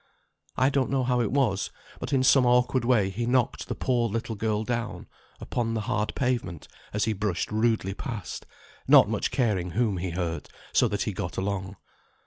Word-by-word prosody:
I 130 +2 +3
don't 135 -2 +1
know 135 -1 +1
how 125 -1 +1
it 110 - -1
was, 120 -8 +1 0.3
but - - -5
in 135 -2 +3
some 130 0 +6
awkward 125 0 +3
way 115 -6 +3
he 115 +4 -3
knocked 125 -1 +1
the - - -3
poor 120 -3 +1
little 115 +2 -3
girl 110 0 -1
down 115 -1 -3 0.3
upon 115 -2 -2
the 110 - -1
hard 105 -2 -1
pavement 120 - -2 0.2
as 105 - 0
he 110 - 0
brushed 100 -3 -2
rudely 110 -3 +1
past, 110 - -6 0.4
not - - +8
much - - -1
caring 100 -8 0
whom 110 -5 +1
he 90 +1 -2
hurt, 85 -3 -3 0.2
so - - +4
that - - -1
he - - -2
got - - -5
along. 95 0 -2
115 Hz, 185 wpm, -27 LUFS, 100-125 Hz, 0.4 s, not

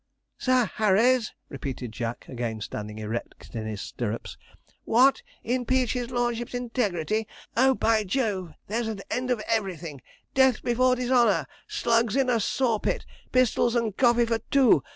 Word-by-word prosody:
'Sir 255 -2 +3
Harry's!' 220 +3 +3 0.2
repeated 135 -4 -5
Jack, 115 +1 -4
again 120 -3 -4
standing 105 +1 -6
erect 110 +2 -6
in 110 -2 -4
his 105 -2 -5
stirrups. 115 -1 -4 0.5
'What! 265 - +4 0.2
impeach 250 0 +1
his 245 -1 -3
lordship's 240 -1 -1
integrity 220 -4 -1 0.3
oh, 265 +2 +4
by 225 -2 +2
Jove, 195 -5 -2
there's 225 +3 -2
an 215 -3 -4
end 250 0 -1
of 235 -4 0
everything! 180 - -2 0.3
Death 265 -3 +4
before 250 +1 +3
dishonour! 240 - +3 0.2
Slugs 230 -1 +1
in 265 -2 +2
a 235 - +2
saw 230 +1 +1
pit! - - -2 0.3
Pistols 250 -1 +3
and 225 -4 0
coffee 240 -1 +4
for 230 -1 0
two! 260 - +5
230 Hz, 145 wpm, -26 LUFS, 170-250 Hz, 0.5 s, two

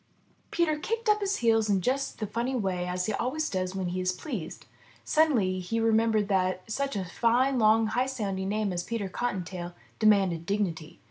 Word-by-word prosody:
'' - - -37
Peter 315 -3 +1
kicked 455 +7 -3
up 420 0 +4
his 400 0 0
heels 225 -2 +2
in 200 -2 +3
just 265 +8 -1
the 215 - -3
funny 235 +5 -2
way 180 -5 -1
he 215 - -1
always 270 +9 -1
does 185 0 -2
when 185 -2 -2
he 185 +1 -2
is 185 0 +1
pleased. 185 - -6 0.4
Suddenly 235 -13 +2
he 205 +6 -2
remembered 225 -2 +2
that 185 -2 0
such 275 +1 -2
a 190 -2 -2
fine, 245 +7 +2
long, 220 0 +5
high 245 +4 0
sounding 195 -7 -3
name 210 -2 -1
as 175 - -1
Peter 220 +1 -3
Cottontail 180 -5 -4 0.2
demanded 195 -6 +3
dignity. 175 -6 -2
215 Hz, 185 wpm, -28 LUFS, 185-250 Hz, 0.4 s, long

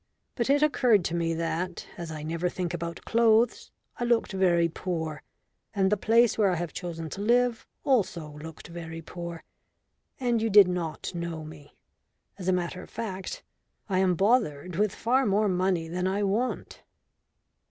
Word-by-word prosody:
"But 235 0 -1
it 285 +1 +4
occurred 245 - +3
to 170 - -1
me 165 -1 0
that, 170 +2 -3
as 170 -1 -6
I 155 -1 -6
never 165 +3 -1
think 175 -1 -3
about 170 0 -5
clothes, 230 0 +3 0.3
I - - -1
looked 235 -2 +2
very 175 -3 +3
poor, 160 -2 -4 0.5
and 190 -1 +2
that - - +5
the - - -12
place 230 0 +4
where 205 -2 +5
I 180 - +1
have 170 -2 -4
chosen 165 -3 -5
to 200 - -5
live 240 +1 +2 0.2
also 180 - +1
looked 160 0 -9
very 165 -1 -7
poor. 170 0 -7 0.8
And 240 -3 +1
you 225 - +1
did 205 -2 +8
not 170 -4 -3
know 170 -2 -4
me. 150 -2 -12 0.6
As 185 - -6
a - - +4
matter 180 0 -1
of - - -12
fact, 195 -4 -5 0.5
I 185 -1 +2
am 185 -1 +3
bothered 180 - +1
with 210 +1 +1
far 255 +4 +2
more 205 +2 +3
money 180 -3 +1
than 180 +2 -2
I 200 +2 0
want." 215 +6 -2
180 Hz, 175 wpm, -27 LUFS, 170-220 Hz, 0.8 s, did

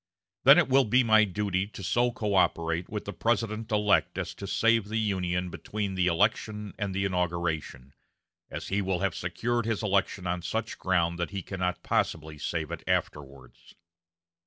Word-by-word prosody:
Then - - +9
it - - +4
will 135 0 +4
be 125 +4 +4
my 110 -2 +5
duty 100 -1 -1
to 100 -2 -10
so 120 +6 +2
coöperate 90 -6 0
with 105 -1 -5
the 100 - -5
President 115 -1 -1
elect 105 -1 +2
as - - -3
to 100 - -8
save 115 +1 +2
the 110 +2 -3
Union 90 -4 -1
between 100 0 -4
the 90 -1 +1
election 105 +3 0
and 100 -3 -2
the 100 0 0
inauguration, 85 -7 -2 0.6
as - - -6
he 100 +2 +1
will 95 -2 -1
have 100 -3 0
secured 120 +7 -2
his 115 -1 -1
election 100 -2 0
on 90 0 -1
such 110 +5 -3
ground 85 -2 +1
that 85 - -1
he 100 -2 -5
cannot 90 -1 -3
possibly 75 -1 -1
save 80 0 -3
it - - -6
afterwards." 70 -3 -4
95 Hz, 170 wpm, -28 LUFS, 85-110 Hz, 0.6 s, Then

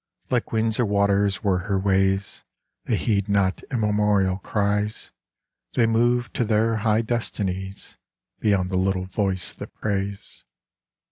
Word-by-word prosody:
Like 125 -2 0
winds 110 0 +1
or 120 - +3
waters 100 0 +2
were 95 -3 +2
her 100 +1 -1
ways: 95 0 +1 0.4
They - - +1
heed 100 -2 0
not 100 -2 +1
immemorial 105 -4 +1
cries; 105 +1 -1 0.6
They 120 - +3
move 120 +2 +1
to - - 0
their 110 0 +2
high 110 +1 +2
destinies 95 -5 -4 0.4
Beyond 100 -3 +1
the 95 - 0
little 95 0 0
voice 95 -1 -1
that - - -10
prays. 100 -1 -4
100 Hz, 130 wpm, -24 LUFS, 95-110 Hz, 0.6 s, or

